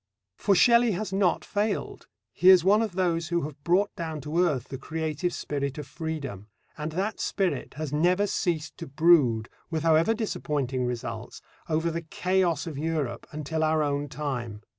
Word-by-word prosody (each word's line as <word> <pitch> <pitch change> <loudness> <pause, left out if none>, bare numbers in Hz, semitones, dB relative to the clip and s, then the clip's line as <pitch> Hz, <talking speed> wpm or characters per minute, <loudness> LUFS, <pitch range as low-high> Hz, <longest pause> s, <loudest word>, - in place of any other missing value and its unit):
For 200 - +2
Shelley 235 +2 +5
has 195 +1 -4
not 190 -3 +1
failed. 205 0 -2 0.3
He 185 - +5
is 185 -3 +8
one 205 +4 +5
of 220 -5 -2
those 170 -3 0
who 170 0 0
have 145 -1 -7
brought 190 +4 +2
down 160 -2 -4
to 150 +4 -2
earth 140 -8 -1
the 135 - -6
creative 160 +3 -2
spirit 140 -3 -3
of 150 - -5
freedom. 140 - -5 0.3
And 150 +1 -5
that 195 +6 -2
spirit 180 -12 -1
has 150 -1 -4
never 180 +6 +3
ceased 165 -6 -2
to - - -7
brood, 140 -7 +4 0.2
with 160 -2 -2
however 165 +7 +4
disappointing 140 - -2
results, 120 -1 -5 0.3
over 160 +1 +1
the 165 +1 -3
chaos 175 -1 0
of 155 -5 -5
Europe 150 -7 -2
until 155 +1 -2
our 155 0 +2
own 145 0 -1
time. 120 -8 -4
160 Hz, 170 wpm, -27 LUFS, 145-180 Hz, 0.3 s, is